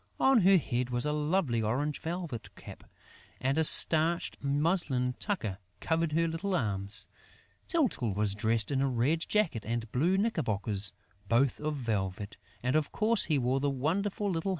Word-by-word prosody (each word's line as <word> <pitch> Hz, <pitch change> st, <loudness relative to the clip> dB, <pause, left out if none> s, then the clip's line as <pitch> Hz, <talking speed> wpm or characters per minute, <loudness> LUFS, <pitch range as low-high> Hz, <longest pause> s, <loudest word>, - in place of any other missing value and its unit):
On 265 Hz, -4 st, +4 dB
her 190 Hz, +1 st, +5 dB
head 125 Hz, -6 st, -2 dB
was 120 Hz, +1 st, 0 dB
a 150 Hz, -, 0 dB
lovely 150 Hz, -5 st, 0 dB
orange 135 Hz, +7 st, -2 dB
velvet 165 Hz, -7 st, -6 dB
cap; -, -, -12 dB, 0.5 s
and 135 Hz, +1 st, 0 dB
a -, -, +3 dB
starched 160 Hz, +1 st, +5 dB
muslin 140 Hz, -3 st, 0 dB
tucker 110 Hz, -, -3 dB, 0.2 s
covered 160 Hz, -1 st, -1 dB
her 165 Hz, +1 st, +1 dB
little 175 Hz, +4 st, -3 dB
arms. 100 Hz, -, -2 dB, 0.6 s
Tyltyl 220 Hz, -, 0 dB
was 105 Hz, -1 st, +1 dB
dressed 110 Hz, +2 st, 0 dB
in 135 Hz, -1 st, 0 dB
a 140 Hz, -, +1 dB
red 130 Hz, +6 st, 0 dB
jacket 165 Hz, -, -1 dB
and 115 Hz, 0 st, -4 dB
blue 170 Hz, +9 st, +1 dB
knickerbockers, 110 Hz, -, +1 dB, 0.4 s
both 120 Hz, +3 st, +2 dB
of 155 Hz, 0 st, -3 dB
velvet; 105 Hz, -5 st, -4 dB, 0.3 s
and 125 Hz, +3 st, 0 dB
of 155 Hz, -2 st, 0 dB
course 220 Hz, +1 st, +3 dB
he 155 Hz, -, +1 dB
wore 130 Hz, +1 st, 0 dB
the 145 Hz, +1 st, 0 dB
wonderful 180 Hz, +10 st, -2 dB
little -, -, 0 dB
hat -, -, -2 dB
on 165 Hz, -, -1 dB
his -, -, -7 dB
head. -, -, -2 dB
140 Hz, 175 wpm, -29 LUFS, 115-170 Hz, 0.6 s, her